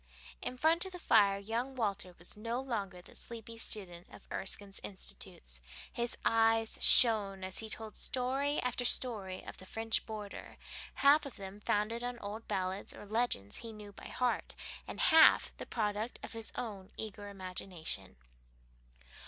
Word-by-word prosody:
In 255 - -4
front 320 +5 +4
of 380 - -8
the - - -5
fire 205 - +4
young 230 +6 -3
Walter 200 -6 -2
was 175 - -8
no 230 +3 -3
longer 200 -9 -4
the - - -15
sleepy 230 -1 -9
student 185 -6 -2
of - - -15
Erskine's 195 +1 -3
"Institutes"; - - -4 0.3
his 235 0 -2
eyes 225 0 +3
shone 205 -5 +7
as 185 0 +1
he 220 - -2
told 220 0 -6
story 270 +3 0
after 250 0 0
story 210 -7 +3
of - - -8
the 185 - -11
Scotch 225 +2 -1
border, 210 -2 -7 0.4
half 290 +1 +5
of 270 - -10
them 195 +1 -8
founded 210 +3 0
on 245 0 -3
old 215 +1 -7
ballads 190 +1 -2
or - - -10
legends 215 - -1
he 230 -1 -7
knew 210 -1 -10
by - - -11
heart 250 -1 -1 0.3
and - - -6
half 320 0 +6
the - - -7
product 215 +1 -2
of - - -6
his 225 -1 -2
own 200 -5 -5
eager 205 -1 -6
imagination. 180 - -4
215 Hz, 160 wpm, -33 LUFS, 195-240 Hz, 0.4 s, shone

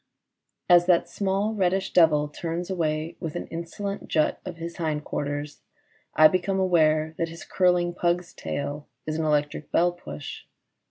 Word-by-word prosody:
As 175 -1 +6
that 175 -2 +4
small 200 +2 -1
reddish 190 -1 0
devil 155 -4 +5
turns 170 +4 -4
away 160 -2 -1
with 165 -3 -5
an - - -3
insolent 195 +4 -5
jut 155 -2 +1
of 180 -2 -7
his 170 +1 -6
hindquarters, 150 -2 -3 0.5
I 155 - +9
become 190 +3 0
aware 160 -4 +3
that 165 - 0
his 165 0 -9
curling 180 -1 +2
pug's 175 -1 -1
tail 145 +1 -4 0.2
is 155 - -2
an 160 - 0
electric 150 0 0
bell 175 +1 +3
push. 175 -4 -8
170 Hz, 150 wpm, -26 LUFS, 155-180 Hz, 0.5 s, I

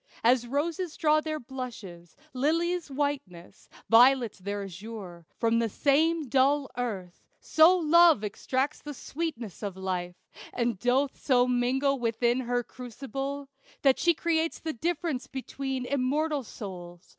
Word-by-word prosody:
As 240 +1 +3
roses 315 +5 -2
draw 310 0 +3
their 310 0 -3
blushes, 225 - -8 0.2
lilies 330 +5 0
whiteness, 270 -11 -4 0.2
Violets 240 -1 +5
their 200 +2 -4
azure, 190 -3 -9
from 230 0 +2
the 230 -1 0
same 305 +6 +2
dull 275 +2 +2
earth, 200 -8 -5 0.2
So 325 +4 +5
Love 335 - +5
extracts 260 +7 -2
the 295 -1 -7
sweetnesses 265 - -5
of 200 -3 -5
Life, 180 -2 -3 0.4
And 235 -5 -1
doth 260 +4 +1
so 250 -2 +3
mingle 250 +3 +1
all 275 - -2
within 235 +1 +1
her 245 -1 -1
crucible, 270 +3 -6 0.4
That 270 -2 +4
she 340 -1 +3
creates 330 0 0
the 320 -1 -4
difference 320 -1 -2
between 265 -1 -4
Immortal 280 +3 0
souls. 175 -5 -9
260 Hz, 135 wpm, -28 LUFS, 225-295 Hz, 0.4 s, Violets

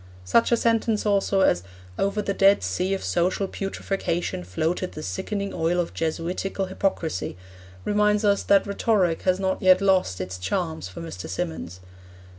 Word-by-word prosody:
Such 230 - +3
a 235 - +5
sentence, 225 -2 +1
also, 200 -1 +2
as 90 - +3 0.4
'over 200 +2 0
the 200 - -1
Dead 195 +1 +4
Sea 185 +2 0
of 190 - -6
social 185 +3 0
putrefaction 190 - -3
floated 160 - -2
the 155 - -7
sickening 200 - -3
oil 170 +1 0
of 175 - -2
Jesuitical 175 +4 -2
hypocrisy,' 185 - -2 0.5
reminds 210 +1 +2
us 200 -1 +3
that 200 -1 +4
rhetoric 200 -4 +1
has 185 +1 +2
not 190 -1 -1
yet 185 -1 +6
lost 190 - +2
its 95 0 -5
charms 160 - -2
for 95 - -9
Mr. 85 +2 -7
Symonds. 85 0 -4
185 Hz, 155 wpm, -25 LUFS, 160-200 Hz, 0.5 s, yet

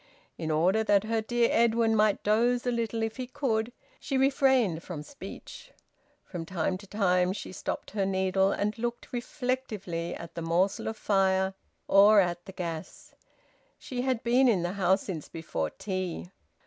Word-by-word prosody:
In 160 - -4
order 180 +8 +2
that 205 -2 +4
her 225 0 0
dear 235 +1 +1
Edwin 230 -1 +3
might 210 -1 +2
doze 240 +4 +2
a 245 - +1
little 230 -1 -1
if 225 +2 -3
he 255 -1 -4
could, 235 -3 -1 0.3
she 275 - -2
refrained 265 - +3
from 160 -5 -7
speech; 285 - -10 0.5
from 175 -3 -6
time 185 +1 -1
to 200 - -13
time 185 -3 +2
she 195 - -7
stopped - - -5
her 200 -2 -1
needle 190 0 +2
and 210 +1 -1
looked 240 +1 -4
reflectively 240 - -3
at 170 - -9
the 170 - -5
morsel 175 +4 0
of 220 - -3
fire, 190 -2 +2 0.3
or 205 +2 +7
at 175 -2 +1
the 190 - -8
gas. 170 -4 -6 0.6
She 250 -2 -5
had 255 -2 -1
been 250 +3 +4
in 195 -8 +3
the 175 +1 -2
house 190 -1 +2
since 165 -6 -6
before 80 - -3
tea. 185 - -4
200 Hz, 165 wpm, -28 LUFS, 180-235 Hz, 0.6 s, or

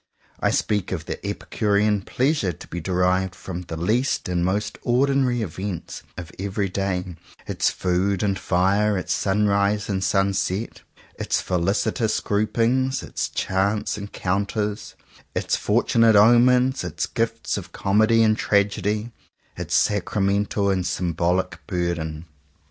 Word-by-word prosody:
I - - +2
speak 105 -3 0
of 85 -4 -3
the - - -6
epicurean 105 0 0
pleasure 130 - 0
to 80 - -12
be 85 - -5
derived 90 +1 +1
from 90 0 -6
the 85 -2 -7
least 115 - 0
and 90 -1 0
most 105 +3 -1
ordinary 125 -1 +2
events 95 -1 -5 0.2
of 85 -3 -7
every 100 0 -2
day 90 -2 -2
— - - -24
its - - +1
food 95 +2 0
and 100 -2 0
fire, 100 +4 +2
its 90 -1 -1
sunrise 100 +1 +1
and 95 -1 -1
sunset, 95 +2 0 0.4
its - - 0
felicitous 100 +5 0
groupings, 120 +5 0
its - - -3
chance 100 +3 -1
encount 100 0 -3
ers, 105 0 -3 0.4
its - - 0
fortunate 115 -1 +3
omens, 125 +4 +5
its 85 -1 -2
gifts 115 -1 -2
of - - -6
comedy 110 +3 +3
and 110 -1 +2
tragedy, 105 +2 0 0.4
its - - -3
sacramental 100 +1 +1
and 95 -2 0
symbolic 90 0 -1
burden. 85 -3 -2
100 Hz, 130 wpm, -23 LUFS, 90-105 Hz, 0.4 s, omens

